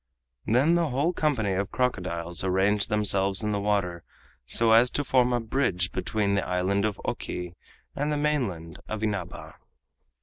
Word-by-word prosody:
Then 130 Hz, +9 st, +3 dB
the 170 Hz, -2 st, +2 dB
whole 140 Hz, +7 st, 0 dB
company 130 Hz, -, 0 dB
of 95 Hz, +1 st, -1 dB
crocodiles 90 Hz, -8 st, -1 dB
arranged 95 Hz, +2 st, +2 dB
themselves 100 Hz, -1 st, +1 dB
in 105 Hz, -, 0 dB
the 105 Hz, -, 0 dB
water 100 Hz, -4 st, -1 dB, 0.4 s
so 115 Hz, -, +2 dB
as 115 Hz, +2 st, +6 dB
to 145 Hz, -, -2 dB
form 125 Hz, -2 st, +2 dB
a 120 Hz, -, +1 dB
bridge 110 Hz, -7 st, -1 dB
between 105 Hz, -2 st, -1 dB
the 100 Hz, -, +1 dB
Island 95 Hz, +3 st, 0 dB
of 105 Hz, -3 st, -2 dB
Oki 90 Hz, -1 st, -4 dB, 0.4 s
and 145 Hz, +2 st, -1 dB
the 150 Hz, -, 0 dB
mainland 120 Hz, -, -2 dB
of 110 Hz, 0 st, -4 dB
Inaba. 100 Hz, -5 st, -4 dB
105 Hz, 160 wpm, -26 LUFS, 95-125 Hz, 0.4 s, as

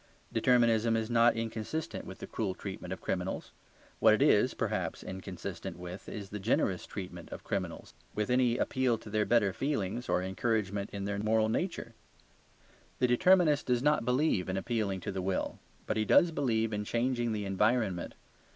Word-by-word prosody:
Determinism 115 Hz, -2 st, +3 dB
is 110 Hz, +1 st, -2 dB
not 120 Hz, 0 st, +5 dB
inconsistent 115 Hz, +7 st, -4 dB
with -, -, -8 dB
the -, -, -7 dB
cruel 100 Hz, -4 st, -3 dB
treatment 95 Hz, -2 st, -7 dB
of 95 Hz, -, -5 dB
criminals. 95 Hz, 0 st, -3 dB, 0.5 s
What -, -, +6 dB
it -, -, -3 dB
is -, -, +4 dB
(perhaps) -, -, -2 dB
inconsistent 95 Hz, -2 st, -6 dB
with 90 Hz, +2 st, -8 dB
is 100 Hz, -2 st, -7 dB
the 105 Hz, -, -5 dB
generous 95 Hz, -3 st, 0 dB
treatment 90 Hz, -4 st, -7 dB
of -, -, -8 dB
criminals; 90 Hz, -4 st, -4 dB, 0.2 s
with 105 Hz, +2 st, -1 dB
any 125 Hz, -1 st, +3 dB
appeal 130 Hz, -3 st, +1 dB
to 105 Hz, -, -11 dB
their 105 Hz, 0 st, +1 dB
better 105 Hz, -5 st, +3 dB
feelings 120 Hz, -4 st, -2 dB
or 90 Hz, -, +2 dB
encouragement 100 Hz, 0 st, -1 dB
in 100 Hz, -1 st, -4 dB
their 100 Hz, 0 st, -2 dB
moral 110 Hz, +1 st, +2 dB
struggle. 165 Hz, -2 st, -2 dB, 1.0 s
The 125 Hz, -, +2 dB
determinist 155 Hz, +4 st, +4 dB
does 125 Hz, -1 st, +1 dB
not 150 Hz, -3 st, +3 dB
believe 125 Hz, -, +1 dB
in 95 Hz, -, -1 dB
appealing 100 Hz, -3 st, -1 dB
to -, -, -4 dB
the 95 Hz, -1 st, -3 dB
will, 95 Hz, 0 st, -2 dB, 0.3 s
but -, -, -1 dB
he 110 Hz, -, +2 dB
does 170 Hz, +10 st, +5 dB
believe 115 Hz, -7 st, 0 dB
in 105 Hz, 0 st, -1 dB
changing 120 Hz, +1 st, 0 dB
the 105 Hz, -2 st, -2 dB
environment. 100 Hz, -1 st, 0 dB
110 Hz, 170 wpm, -31 LUFS, 95-120 Hz, 1.0 s, What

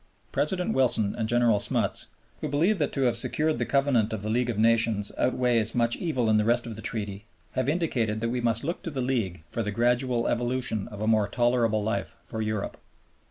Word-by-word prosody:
President 180 Hz, +4 st, 0 dB
Wilson 115 Hz, -6 st, +2 dB
and 110 Hz, -1 st, -2 dB
General 120 Hz, -3 st, +3 dB
Smuts, -, -, +1 dB, 0.3 s
who -, -, -3 dB
believe 170 Hz, +8 st, +2 dB
that 145 Hz, -, 0 dB
to 135 Hz, -, -1 dB
have 120 Hz, -3 st, +2 dB
secured 155 Hz, +6 st, +1 dB
the -, -, -1 dB
Covenant 135 Hz, -6 st, +2 dB
of 105 Hz, -2 st, -4 dB
the 110 Hz, -, -2 dB
League 120 Hz, +1 st, +1 dB
of 115 Hz, -, -2 dB
Nations 110 Hz, -2 st, +2 dB
outweighs 120 Hz, -3 st, +1 dB
much 120 Hz, -1 st, +2 dB
evil 140 Hz, -9 st, -1 dB
in 110 Hz, -1 st, +4 dB
the 105 Hz, -, +3 dB
rest 120 Hz, +2 st, +2 dB
of 115 Hz, -2 st, -6 dB
the 110 Hz, -, -8 dB
Treaty, 105 Hz, -2 st, -4 dB, 0.3 s
have 130 Hz, +1 st, -1 dB
indicated 125 Hz, -10 st, 0 dB
that 115 Hz, +1 st, -1 dB
we 125 Hz, +1 st, -2 dB
must 115 Hz, -1 st, 0 dB
look 170 Hz, +5 st, -3 dB
to -, -, -5 dB
the 140 Hz, -4 st, -5 dB
League 115 Hz, -10 st, -1 dB
for 115 Hz, -, -2 dB
the 105 Hz, -, -2 dB
gradual 120 Hz, +2 st, +1 dB
evolution 120 Hz, -3 st, -1 dB
of 105 Hz, -1 st, -9 dB
a 110 Hz, -, -1 dB
more 110 Hz, -2 st, +3 dB
tolerable 120 Hz, -3 st, +1 dB
life 115 Hz, +1 st, -3 dB
for 110 Hz, -, -5 dB
Europe. 110 Hz, -2 st, -3 dB
115 Hz, 210 wpm, -27 LUFS, 110-130 Hz, 0.3 s, in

